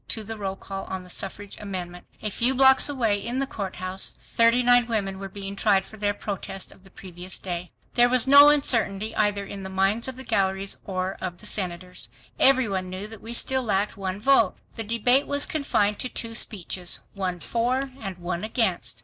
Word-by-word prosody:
to 220 Hz, -, -2 dB
the 225 Hz, +2 st, -6 dB
roll 195 Hz, -2 st, -4 dB
call 195 Hz, 0 st, -7 dB
on 190 Hz, -1 st, -5 dB
the 180 Hz, -, -12 dB
suffrage 200 Hz, +2 st, -5 dB
amendment. 180 Hz, -3 st, -7 dB, 0.2 s
A 210 Hz, -, -1 dB
few 250 Hz, +6 st, +2 dB
blocks 265 Hz, +2 st, +7 dB
away 230 Hz, -8 st, 0 dB
in 240 Hz, +3 st, -3 dB
the 275 Hz, -, 0 dB
courthouse, 190 Hz, -5 st, -3 dB, 0.2 s
thirty 230 Hz, +2 st, +4 dB
nine 245 Hz, -1 st, +5 dB
women 195 Hz, -4 st, -2 dB
were 195 Hz, 0 st, -6 dB
being 195 Hz, 0 st, -7 dB
tried 195 Hz, -2 st, +2 dB
for -, -, -13 dB
their 205 Hz, -1 st, -1 dB
protest 195 Hz, -2 st, -5 dB
of 190 Hz, -, -19 dB
the 190 Hz, -, -17 dB
previous 185 Hz, 0 st, -7 dB
day. 175 Hz, -1 st, -5 dB, 0.2 s
There 245 Hz, 0 st, +5 dB
was 255 Hz, -1 st, +4 dB
no 285 Hz, +2 st, +9 dB
uncertainty 225 Hz, -8 st, +1 dB
either 205 Hz, -1 st, +1 dB
in 200 Hz, 0 st, -7 dB
the 190 Hz, -, -6 dB
minds 195 Hz, +5 st, +1 dB
of 260 Hz, -, -4 dB
the 260 Hz, -, -9 dB
galleries 195 Hz, -3 st, -1 dB
or 185 Hz, -1 st, -3 dB
of 180 Hz, -1 st, -4 dB
the 210 Hz, -, -16 dB
senators. 180 Hz, -3 st, -4 dB, 0.3 s
Every 260 Hz, -3 st, +5 dB
one 190 Hz, -2 st, -3 dB
knew 185 Hz, +2 st, -6 dB
that 220 Hz, 0 st, -11 dB
we 230 Hz, +1 st, -7 dB
still 265 Hz, +2 st, +2 dB
lacked 205 Hz, -3 st, 0 dB
one 190 Hz, 0 st, -4 dB
vote. 230 Hz, -4 st, +3 dB, 0.2 s
The 225 Hz, -, -3 dB
debate 235 Hz, +5 st, +3 dB
was 285 Hz, 0 st, +3 dB
confined 210 Hz, -9 st, 0 dB
to 255 Hz, -, -1 dB
two 230 Hz, -2 st, -3 dB
speeches, 185 Hz, -5 st, 0 dB
one 185 Hz, -3 st, -3 dB
for 255 Hz, +7 st, -1 dB
and 195 Hz, -4 st, -6 dB
one 175 Hz, 0 st, -4 dB
against. 215 Hz, -, 0 dB
205 Hz, 200 wpm, -25 LUFS, 190-235 Hz, 0.3 s, no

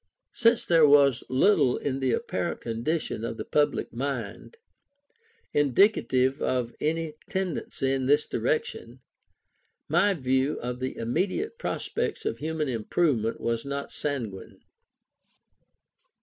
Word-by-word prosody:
Since 230 Hz, 0 st, +3 dB
there 165 Hz, -3 st, +5 dB
was 140 Hz, -3 st, +5 dB
little 140 Hz, -1 st, +3 dB
in 135 Hz, -1 st, -2 dB
the 130 Hz, -2 st, +1 dB
apparent -, -, -2 dB
condition 115 Hz, +2 st, -2 dB
of 115 Hz, 0 st, -4 dB
the -, -, -5 dB
public 150 Hz, -1 st, 0 dB
mind, 130 Hz, -, -5 dB, 1.0 s
indicative 135 Hz, -, +3 dB
of 125 Hz, -2 st, -1 dB
any 160 Hz, 0 st, -1 dB, 0.2 s
tendency 175 Hz, -7 st, -2 dB
in 130 Hz, -1 st, -1 dB
this 145 Hz, +2 st, +4 dB
direction, 470 Hz, 0 st, -2 dB, 0.9 s
my 205 Hz, -1 st, +3 dB
view 130 Hz, 0 st, 0 dB
of 125 Hz, +1 st, -4 dB
the 130 Hz, 0 st, -4 dB
immediate 190 Hz, -, -2 dB
prospects -, -, -3 dB
of 435 Hz, -, -2 dB
human 155 Hz, -1 st, -2 dB
improvement 115 Hz, 0 st, 0 dB
was 115 Hz, -1 st, -1 dB
not 140 Hz, 0 st, -5 dB
sanguine. 120 Hz, -10 st, -5 dB
140 Hz, 115 wpm, -27 LUFS, 125-165 Hz, 1.0 s, there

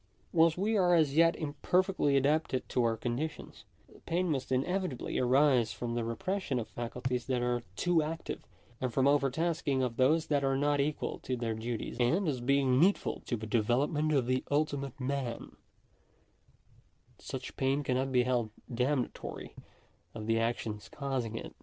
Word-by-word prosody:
Whilst 165 Hz, -1 st, +4 dB
we 210 Hz, +4 st, +1 dB
are 180 Hz, -2 st, +4 dB
as 155 Hz, -4 st, +3 dB
yet 165 Hz, +1 st, +5 dB
imperfectly 155 Hz, 0 st, +1 dB
adapted 140 Hz, -1 st, +1 dB
to 125 Hz, -, +1 dB
our 115 Hz, -1 st, +1 dB
conditions, 130 Hz, +7 st, -4 dB, 0.4 s
pain 175 Hz, +1 st, +1 dB
must 130 Hz, -3 st, -2 dB
inevitably 155 Hz, +2 st, -1 dB
arise 125 Hz, -2 st, +3 dB
from 120 Hz, -1 st, -4 dB
the 120 Hz, -1 st, -1 dB
repression 145 Hz, -, -2 dB
of 115 Hz, -, -3 dB
faculties 125 Hz, +1 st, -3 dB
that 125 Hz, -2 st, 0 dB
are 120 Hz, 0 st, 0 dB
too 175 Hz, -, +2 dB
active, 160 Hz, +2 st, -4 dB, 0.4 s
and 130 Hz, -1 st, -1 dB
from 130 Hz, +2 st, +2 dB
the 140 Hz, -, +6 dB
over 140 Hz, -1 st, +3 dB
tasking 155 Hz, -2 st, 0 dB
of 120 Hz, -2 st, -2 dB
those 155 Hz, +5 st, +3 dB
that 145 Hz, -2 st, +1 dB
are 135 Hz, 0 st, +2 dB
not 145 Hz, +1 st, +1 dB
equal 145 Hz, +2 st, -1 dB
to 130 Hz, -, -3 dB
their 115 Hz, -1 st, -2 dB
duties; 115 Hz, +1 st, -4 dB
and, 165 Hz, +11 st, +2 dB
as 130 Hz, -5 st, -1 dB
being 135 Hz, 0 st, +3 dB
needful 190 Hz, +6 st, +2 dB
to 120 Hz, -, -1 dB
the 110 Hz, -, -6 dB
development 125 Hz, +8 st, +1 dB
of 135 Hz, -5 st, +2 dB
the 130 Hz, +1 st, 0 dB
ultimate 145 Hz, -2 st, -1 dB
man, 130 Hz, -3 st, -3 dB, 1.6 s
such -, -, -7 dB
pain 135 Hz, +2 st, +1 dB
cannot 130 Hz, 0 st, 0 dB
be 125 Hz, -1 st, +4 dB
held 120 Hz, -3 st, 0 dB, 0.2 s
damnatory 125 Hz, +2 st, -2 dB, 0.6 s
of 110 Hz, -1 st, -5 dB
the 115 Hz, 0 st, +2 dB
actions 115 Hz, -2 st, -2 dB
causing 130 Hz, -5 st, -3 dB
it. -, -, -6 dB
135 Hz, 165 wpm, -31 LUFS, 120-155 Hz, 1.6 s, the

